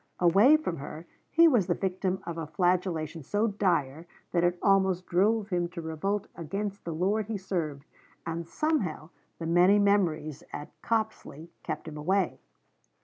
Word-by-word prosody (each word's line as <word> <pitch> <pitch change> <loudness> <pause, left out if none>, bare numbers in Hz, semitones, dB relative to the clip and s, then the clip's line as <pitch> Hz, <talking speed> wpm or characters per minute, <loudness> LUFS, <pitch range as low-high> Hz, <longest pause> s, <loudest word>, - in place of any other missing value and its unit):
Away 200 - +6
from 245 - -4
her, 155 +4 -8 0.2
he 335 +1 +6
was 235 - +3
the 175 - +1
victim 190 0 -2
of 170 - -4
a 165 -2 -5
flagellation 170 -1 0
so 205 - 0
dire 170 -7 0 0.2
that 175 -1 +2
it 175 0 +2
almost 190 -2 +2
drove 205 +4 +2
him 175 -2 0
to 170 0 -7
revolt 185 +6 -2
against 195 +4 -4
the 170 - -3
lord 195 +6 0
he 220 -2 -2
served, 165 -7 -3 0.4
and 165 0 -4
somehow 190 - -1 0.3
the 165 - -5
many 175 +4 +5
memories 170 -8 +1
at 145 - -7
Copsley 215 -8 -3
kept - - -5
him 155 -1 -7
away. 185 +5 0
180 Hz, 155 wpm, -28 LUFS, 165-200 Hz, 0.4 s, Away